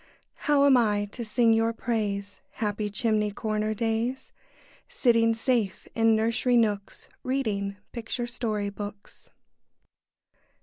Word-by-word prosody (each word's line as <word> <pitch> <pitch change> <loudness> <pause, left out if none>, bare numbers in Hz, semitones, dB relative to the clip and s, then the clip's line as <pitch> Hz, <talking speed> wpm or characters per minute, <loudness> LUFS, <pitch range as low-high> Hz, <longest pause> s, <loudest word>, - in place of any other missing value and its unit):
How 285 -1 +5
am 275 -2 +6
I 210 -3 +2
to 240 - -5
sing 230 +1 +3
your 225 +1 +2
praise, 205 -4 -2
Happy 210 -1 -2
chimney 210 0 +1
corner 215 +1 -2
days, 230 +4 -2 0.6
Sitting 230 - +3
safe 225 -5 -1
in 225 -1 +4
nursery 230 +3 +2
nooks, 205 -3 -1
Reading 210 -7 -2
picture 240 +1 -3
story 220 -4 -2
books? 205 0 -9
225 Hz, 115 wpm, -27 LUFS, 210-235 Hz, 0.6 s, am